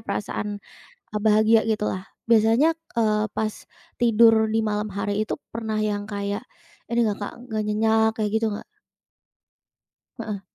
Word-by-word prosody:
perasaan 210 -1 -3 0.5
e 215 - -6
bahagia 220 +1 +5
gitu 215 -2 0
lah. 185 0 -4 0.2
Biasanya, 230 +8 +4 0.2
eee, 215 -2 +2
pas 215 -1 -2 0.4
tidur 225 -1 +5
di 225 - +2
malam 210 -1 -2
hari 200 +1 -2
itu - - -5
pernah 220 -1 -3
yang 205 -1 -1
kayak 205 +1 -4 0.5
ini 235 - +1
nggak 205 - -2
Kak, - - -6 0.2
nggak 215 -2 -1
nyenyak 220 +1 +3
kayak 210 - 0
gitu 220 -1 0
nggak? 205 - -6 1.5
Heeh. 205 -3 -5
215 Hz, 140 wpm, -24 LUFS, 210-225 Hz, 1.5 s, bahagia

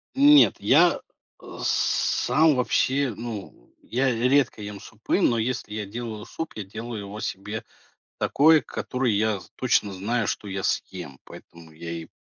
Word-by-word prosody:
Нет, 290 +2 +7
я, - - +4 0.4
э, - - -10
сам 155 -1 +2
вообще, 130 +1 +1
ну, 110 - -8
я 130 +3 0
редко 125 0 +2
ем 105 -1 -7
супы. 110 - -3
Но 120 - +3
если 115 -2 -3
я 105 -1 -3
делаю 110 0 -6
суп, 160 +7 -6
я 110 - -5
делаю 110 +3 -7
его 100 +1 -8
себе 105 +2 -5 0.6
такой, 155 +2 +4
который 125 -5 -2
я 105 -1 +1
з 90 - -16
точно 110 -5 +1
знаю, 110 +4 -1
что 105 - -3
я 95 0 -4
съем. 85 -10 -3
Поэтому 85 -1 -14
я 85 +2 -8
и 85 -1 -7
110 Hz, 150 wpm, -25 LUFS, 100-125 Hz, 0.6 s, Нет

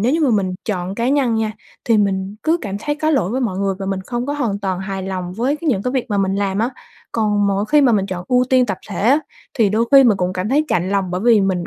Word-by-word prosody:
nếu 240 +6 +2
như 330 - +1
mà 285 -5 +3
mình 195 -4 0
chọn 185 -3 -3
cá 235 +3 -1
nhân 265 -4 +2
nha, 220 -1 -1 0.3
thì 230 -2 +3
mình 195 0 -1
cứ 320 +2 +2
cảm 200 -2 -4
thấy 295 - -2
có 310 +1 0
lỗi 265 - +1
với 260 +2 -1
mọi 195 -7 -2
người 195 -1 0
và 195 - -5
mình 195 -1 -2
không 240 0 -3
có 285 - -1
hoàn 235 -9 -1
toàn 190 -2 -2
hài 190 -1 -4
lòng 185 -2 -4
với 250 +9 -1
cái 325 0 -4
những 200 -7 +1
cái 250 - -2
việc 260 -3 0
mà 205 - +1
mình 195 0 +1
làm 200 -1 -1
á, 230 +4 +1 0.4
còn 210 -2 +1
mỗi 200 +1 0
khi 300 -1 +5
mà 260 -4 +4
mình 195 -3 +1
chọn 180 -2 -5
ưu 250 0 +3
tiên 255 -1 +4
tập 195 -4 -3
thể 195 - -5
á 255 +9 +4 0.4
thì 225 -7 +3
đôi 220 +3 +1
khi 275 -1 +8
mình 225 -5 +4
cũng 180 -1 -1
cảm 185 +2 -3
thấy 290 +5 +2
chạnh 180 +1 0
lòng 195 -2 0
bởi 180 +1 -2
vì 225 -1 +4
mình 185 -3 0
210 Hz, 300 wpm, -19 LUFS, 190-250 Hz, 0.4 s, khi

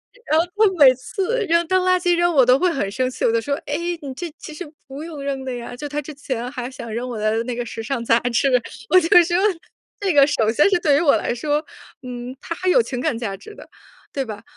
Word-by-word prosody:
是， - - -22
然 310 - +4
后 335 - +2
她 425 0 +5 0.2
每 255 - +8
次 395 - -2
扔 335 +1 +3
当 370 +1 +2
垃 365 0 +3
圾 355 0 +2
扔 345 0 +2
我 265 - +6
都 250 +1 +5
会 360 -1 +2
很 200 -10 -2
生 255 +4 -1
气， - - -3
我 - - +3
就 230 - +2
说， 280 +4 -1
哎， 290 - -2 0.3
你 275 -3 -6
这 335 +5 -6
其 310 - -10
实 305 0 -8 0.2
不 275 +3 -8
用 320 -4 -8
扔 275 -1 -3
的 260 - -3
呀， 240 0 -7
就 290 +4 -6
她 295 +1 -3
之 300 +2 -9
前 255 -4 -4
还 250 -3 -5
想 235 -4 -8
扔 240 +3 -3
我 235 - -5
的 215 +2 0
那 245 0 -4
个 240 0 -3
时 225 - -6
尚 240 +1 -3
杂 230 0 +3
志， 245 +3 +1 0.4
我 370 - +7
就 330 0 -2
说 345 +1 0 0.6
这 390 -3 0
个 285 -2 +7
首 230 -7 +1
先 295 - +4
是 365 -3 +2
对 290 -4 +3
于 - - +2
我 295 -5 +4
来 - - -1
说， 295 +5 -1 0.4
嗯， 250 0 -7
它 - - -4
还 370 +2 -1
有 480 - +5
情 255 - -5
感 235 - -1
价 220 -5 -4
值 430 - -13
的， - - -13 0.4
对 275 - -2
吧？ 210 -2 -8
275 Hz, 285 characters per minute, -21 LUFS, 245-335 Hz, 0.6 s, 每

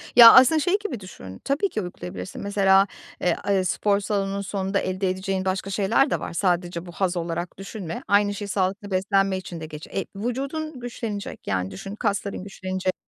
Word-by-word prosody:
Ya, 235 -1 +12
aslında 310 +5 +7
şey 360 +6 +2
gibi 360 - -4
düşün, 95 - -10
tabii 285 +9 +1
ki 215 - -2
uygulayabilirsin. 90 - -7
Mesela, 195 -1 +4 0.3
eee, 175 -2 +2
a 195 -2 +2
spor 200 +2 +2
salonunun 200 -1 -1
sonunda 195 0 -1
elde 185 +1 -1
edeceğin 190 0 -2
başka 190 +1 -1
şeyler 210 +8 +2
de - - 0
var, - - -6
sadece 175 -1 0
bu 175 - -9
haz 180 0 -1
olarak 170 +1 -3
düşünme. 195 -3 -6
Aynı 205 0 +3
şey 205 0 -5
sağlıklı 195 +1 -1
beslenme 195 0 +2
için 180 -2 -7
de 160 - -6
geç 155 0 -9
Eee, 195 - -3
vücudun 275 +7 -3
güçlenecek, 230 -4 -6
yani, 95 -1 -1
düşün, 195 - -7
kasların 200 -3 -2
güçlenecek. 185 -1 -3
195 Hz, 180 wpm, -24 LUFS, 185-210 Hz, 0.3 s, Ya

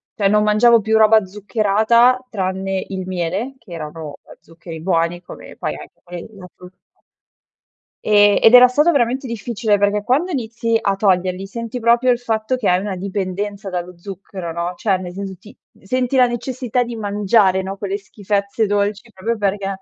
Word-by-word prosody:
cioè, 200 -2 +1
non 210 +1 +3
mangiavo 225 +2 +4
più 220 +1 +1
roba 220 0 +5
zuccherata, 220 +5 +2
tranne 190 -2 -2
il 190 -1 -5
miele, 185 +8 -3
che 220 -7 -13
erano, 160 0 -7 0.2
uhm, - - -15
zuccheri 165 -1 -11
buoni, 170 0 0
come - - -12
poi - - -3
anche - - -13
quelli 175 -1 -8
della 195 -4 -13
frutta. 180 0 -15 1.3
Ehm, 205 -1 +5
ed 225 - +5
era 250 0 +10
stato 295 +7 +3
veramente 260 -2 0
difficile, 225 -3 -1
perché 205 +1 +1
quando 275 - +1
inizi 230 -5 -1
a 200 -3 0
toglierli 190 -1 0
senti 230 +3 -6
proprio 235 +2 +3
il 240 - 0
fatto 225 0 -1
che 250 -5 -1
hai 180 - +3
una 195 -1 -4
dipendenza 195 +1 -4
dallo 180 0 -5
zucchero, 185 -1 -8
no, 170 +2 -3
cioè, 195 -1 0
ne 180 -1 -7
senso 195 +1 -6
ti 215 - -16 0.2
senti 255 +5 -1
la 250 -1 +5
necessità 250 0 -2
di 235 -1 -7
mangiare, 205 -2 +2
no, 195 +1 -6
quelle 200 0 -3
schifezze 200 +1 -2
dolci 205 +3 -1
proprio 220 +4 -3
perché, 200 0 -1
205 Hz, 175 wpm, -19 LUFS, 190-230 Hz, 1.3 s, era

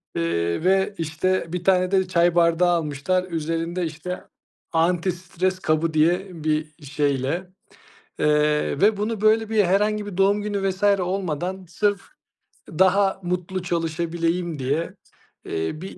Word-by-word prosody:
Eee, 85 - -1
ve 190 +2 +2
işte 165 +4 -1
bir 180 - -3
tane 185 0 +3
de 190 -1 +2
çay 175 -1 +2
bardağı 170 +1 +4
almışlar. 170 +2 0
Üzerinde, 165 +2 -2
işte, 165 +3 -6 0.5
"Anti-stres 180 +2 0
kabı." 155 0 +1
diye 175 +1 +1
bir 155 0 -1
şeyle. 145 +5 -1 0.7
Eee, 150 -1 +2
ve 210 +1 +4
bunu 210 +1 -2
böyle 220 0 +3
bir 215 -3 +3
herhangi 210 +3 +1
bir 200 - -7
doğum 200 +2 +3
günü 200 -2 -1
vs. 190 +2 -8 0.2
olmadan, 185 0 -3
sırf 205 +2 0 0.7
daha 190 +3 +2
mutlu 180 +1 -3
çalışabileyim 170 -1 -2
diye, 145 +6 -1 0.5
eee, 80 - -3
bir 190 - -8
175 Hz, 130 wpm, -23 LUFS, 160-190 Hz, 0.7 s, bardağı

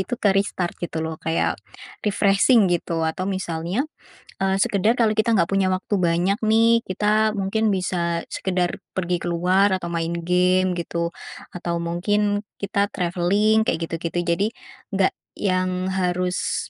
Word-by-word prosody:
itu 245 +6 -3
ke-restart, 195 -3 +1
gitu, 170 -2 -4
loh. 160 0 -5
Kayak 165 0 -1 0.4
refreshing, 205 +2 +4
gitu. 165 -1 -1
Atau, 170 +4 -2
misalnya, 185 - -2 0.6
eee, 190 0 +2
sekedar 205 +4 +2
kalau 220 -2 +3
kita 230 +1 +2
nggak 170 -4 +2
punya 195 -1 +2
waktu 185 +2 -2
banyak, 175 +2 +1
nih. 230 +1 +4
Kita 215 +3 +1
mungkin 215 +3 0
bisa 175 -2 -1
sekedar 180 -2 -1 0.2
pergi 180 -1 0
keluar 180 +3 +2
atau 175 -2 -6
main 170 0 -2
game, 180 +1 +2
gitu. 170 0 -2 0.4
Atau 170 -1 -3
mungkin 205 +5 0 0.2
kita 200 0 0
traveling, 200 +5 +2
kayak 165 -4 -1
gitu-gitu. 165 +1 -3
Jadi, 175 +4 +1 0.5
nggak 190 -1 +2 0.3
yang 185 -1 0
harus, 180 -1 -1
185 Hz, 135 wpm, -23 LUFS, 175-200 Hz, 0.6 s, refreshing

